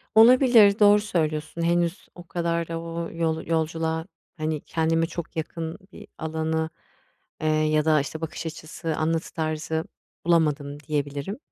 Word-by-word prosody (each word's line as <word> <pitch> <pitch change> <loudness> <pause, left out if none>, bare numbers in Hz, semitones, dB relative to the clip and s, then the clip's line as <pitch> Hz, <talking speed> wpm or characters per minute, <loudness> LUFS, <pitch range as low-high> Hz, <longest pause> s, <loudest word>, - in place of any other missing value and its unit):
Olabilir. 225 -3 +7
Doğru 205 0 +7
söylüyorsun. 155 -5 -2
Henüz 170 +1 0
o 175 - -10
kadar 170 -1 -1
da 165 0 -3
o 165 0 -4
yol 160 -1 -1
yolculuğa, 160 0 -1 0.3
hani, 155 -1 -2
kendime 165 0 +1
çok 170 0 -7
yakın 160 0 -4
bir - - -12
alanı, 160 0 -1 0.7
eee, 155 - 0
ya 155 0 +2
da, 155 -1 +4
işte, 155 +3 -6
bakış 160 +1 -5
açısı, 160 0 -5
anlatı 160 +1 -1
tarzı 160 0 -2 0.4
bulamadım 150 -4 +1
diyebilirim 145 - -3
160 Hz, 135 wpm, -25 LUFS, 155-170 Hz, 0.7 s, Olabilir